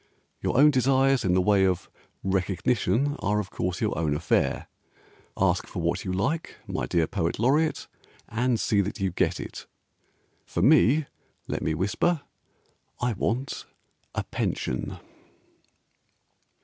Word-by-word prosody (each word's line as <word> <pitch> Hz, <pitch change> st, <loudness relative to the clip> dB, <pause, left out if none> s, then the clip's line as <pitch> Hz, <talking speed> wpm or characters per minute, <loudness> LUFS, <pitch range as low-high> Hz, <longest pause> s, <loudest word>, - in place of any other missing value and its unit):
Your -, -, 0 dB
own 150 Hz, +3 st, +7 dB
desires 135 Hz, 0 st, +3 dB
in 90 Hz, -1 st, +2 dB
the 95 Hz, -, +4 dB
way 100 Hz, 0 st, +4 dB
of 95 Hz, -2 st, +1 dB, 0.4 s
"recognition" 100 Hz, +8 st, +1 dB
Are 100 Hz, +1 st, +1 dB
of 100 Hz, -2 st, -5 dB
course 90 Hz, 0 st, -2 dB
your -, -, 0 dB
own 75 Hz, -2 st, 0 dB
affair, 80 Hz, +2 st, 0 dB, 0.7 s
Ask -, -, +1 dB
for -, -, -6 dB
what 85 Hz, 0 st, 0 dB
you 95 Hz, -, -3 dB
like, 140 Hz, -, -1 dB
my -, -, -3 dB
dear 85 Hz, -2 st, +2 dB
Poet 85 Hz, +1 st, -2 dB
Laureate, 145 Hz, +8 st, +1 dB, 0.4 s
And 120 Hz, 0 st, 0 dB
see 100 Hz, -2 st, +2 dB
that 100 Hz, +3 st, -4 dB
you 95 Hz, -1 st, 0 dB
get 85 Hz, 0 st, 0 dB
it, -, -, -8 dB, 0.8 s
For -, -, -2 dB
me 145 Hz, +6 st, +5 dB, 0.4 s
(Let -, -, -3 dB
me 80 Hz, -, 0 dB
whisper) 140 Hz, -, +1 dB, 0.8 s
I 125 Hz, -1 st, 0 dB
want 120 Hz, +7 st, -2 dB, 0.5 s
a -, -, -1 dB
pension. 65 Hz, -, -3 dB
105 Hz, 135 wpm, -26 LUFS, 90-130 Hz, 0.8 s, own